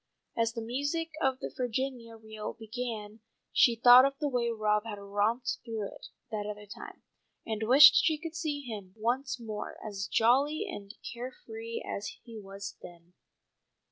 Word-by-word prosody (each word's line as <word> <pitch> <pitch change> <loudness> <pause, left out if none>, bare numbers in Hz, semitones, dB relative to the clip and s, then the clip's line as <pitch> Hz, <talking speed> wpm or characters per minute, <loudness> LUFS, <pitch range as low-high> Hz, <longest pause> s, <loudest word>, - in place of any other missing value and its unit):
As 230 0 +1
the 230 -1 -4
music 285 +8 -2
of 265 -1 +2
the - - -6
Virginia 245 -1 -3
reel 220 -1 -7
began 220 -2 -6 0.3
she 235 - +5
thought 245 +2 +9
of 275 0 +1
the 295 - -1
way 245 -3 0
Rob 210 -2 +1
had 220 -2 -6
romped 210 +5 -1
through 225 -3 -4
it - - -12 0.2
that 210 -1 -3
other 210 0 -6
time, 200 - -10 0.4
and 220 -1 -3
wished 280 +5 +9
she 315 -2 +2
could 330 +1 -7
see 310 -3 -2
him 210 -7 -8
once 250 +4 -1
more 215 -3 -6
as 200 -2 -4
jolly 280 - +3
and 205 - -8 0.2
care 245 +2 -5
free 225 +1 -6
as 200 - -5
he 230 -2 -9
was 200 0 -8
then. 175 0 -13
230 Hz, 165 wpm, -30 LUFS, 210-260 Hz, 0.4 s, thought